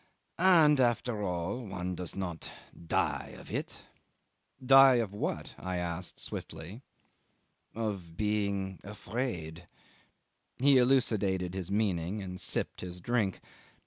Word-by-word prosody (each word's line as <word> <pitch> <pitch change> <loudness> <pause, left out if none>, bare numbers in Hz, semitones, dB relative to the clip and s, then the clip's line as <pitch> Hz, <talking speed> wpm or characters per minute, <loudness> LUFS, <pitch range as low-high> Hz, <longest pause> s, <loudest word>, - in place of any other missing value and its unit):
"And 165 -6 +6
after 120 -2 +1
all, 90 +5 -2
one 90 -3 -4
does 90 -1 -5
not 90 -4 -4 0.4
die - - 0
of - - -12
it." - - -4 0.8
"Die 135 0 +8
of 115 -5 0
what?" 105 - -3
I 90 -1 -3
asked 90 0 -4
swiftly. 95 +10 -7 0.9
"Of 100 -7 -4
being 100 -2 -1
afraid." 95 -5 -5 0.9
He 135 0 +5
elucidated 105 -8 +2
his 95 -2 -4
meaning 100 -2 0
and 90 -2 -6
sipped - - -1
his 90 -1 -6
drink. 105 -2 0
100 Hz, 115 wpm, -31 LUFS, 90-120 Hz, 0.9 s, Die